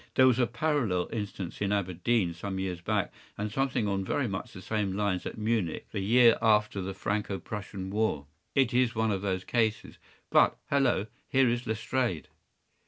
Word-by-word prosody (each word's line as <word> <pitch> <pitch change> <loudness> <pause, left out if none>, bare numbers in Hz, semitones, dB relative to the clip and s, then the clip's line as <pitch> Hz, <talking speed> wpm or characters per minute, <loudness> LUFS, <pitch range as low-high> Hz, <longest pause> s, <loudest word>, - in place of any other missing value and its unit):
There 130 - +6
was 130 -1 +4
a 120 - +3
parallel 120 - 0
instance 100 -5 -5
in 100 -1 +1
Aberdeen 95 0 +1
some 95 +3 -5
years 95 -2 -3
back, - - -1 0.2
and 105 +1 -3
something 130 -3 0
on 100 -1 0
very 130 +7 0
much 100 +4 -4
the 105 - -10
same 105 -2 -1
lines 100 -2 -1
at - - -7
Munich 110 -6 -1
the 105 - -3
year 115 +4 +5
after 105 -3 +3
the 95 +1 -4
Franco 100 0 -2
Prussian 95 -2 -6
war. 105 -9 0 0.3
It 130 -2 +3
is 125 -1 +2
one 110 0 +1
of 95 -2 -1
these 95 -2 -1
cases—but, 110 -1 0
hello, 135 -8 +3 0.2
here 135 -1 +4
is 120 +1 -1
Lestrade! 110 - -1
105 Hz, 170 wpm, -29 LUFS, 95-120 Hz, 0.3 s, There